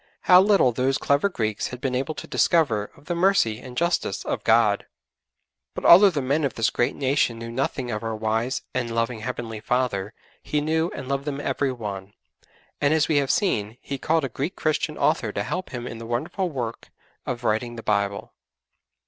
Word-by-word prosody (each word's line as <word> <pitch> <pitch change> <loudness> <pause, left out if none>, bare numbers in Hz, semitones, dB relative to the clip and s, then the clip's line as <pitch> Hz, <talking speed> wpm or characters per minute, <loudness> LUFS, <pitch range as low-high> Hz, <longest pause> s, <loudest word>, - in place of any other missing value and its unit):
How 180 0 +7
little 195 -10 +4
those 130 +3 0
clever 140 +8 +2
Greeks 110 - -2
had 125 - -8
been 130 0 -2
able 135 +5 -2
to - - -7
discover 130 -12 +2
of 140 - -19
the 175 - -2
mercy 170 - +2
and 125 -1 -10
justice 170 +1 0
of - - -3
God! - - +3 0.9
But - - -5
although 195 +4 +9
the 150 -7 -2
men 140 +4 +1
of 140 - -1
this 115 -1 +1
great 120 - 0
nation 135 -4 +1
knew 115 0 -7
nothing 130 0 -2
of 105 -1 -3
our 115 -1 -3
wise 110 +4 -1
and 125 -2 -1
loving 115 0 -1
Heavenly 115 -1 -5
Father, 115 -3 -1 0.3
He 150 - -1
knew 160 +3 0
and 130 - -7
loved 140 +1 -2
them 145 -2 -3
every 140 -1 -1
one, 100 -5 -6 0.7
and 145 +1 +3
as 155 - +2
we 155 - +2
have 140 -2 +1
seen, 110 - 0
He 140 -1 -6
called 160 +2 +1
a - - -4
Greek 145 - -4
Christian 155 -1 -1
author - - +1
to - - -2
help 185 +1 -4
Him 125 -3 -6
in 115 -2 -7
the 115 - -8
wonderful 160 - -2
work 120 -6 -5 0.4
of 125 -1 -3
writing 120 +2 0
the 115 - -8
Bible. 100 -1 -1
130 Hz, 200 wpm, -24 LUFS, 115-150 Hz, 0.9 s, although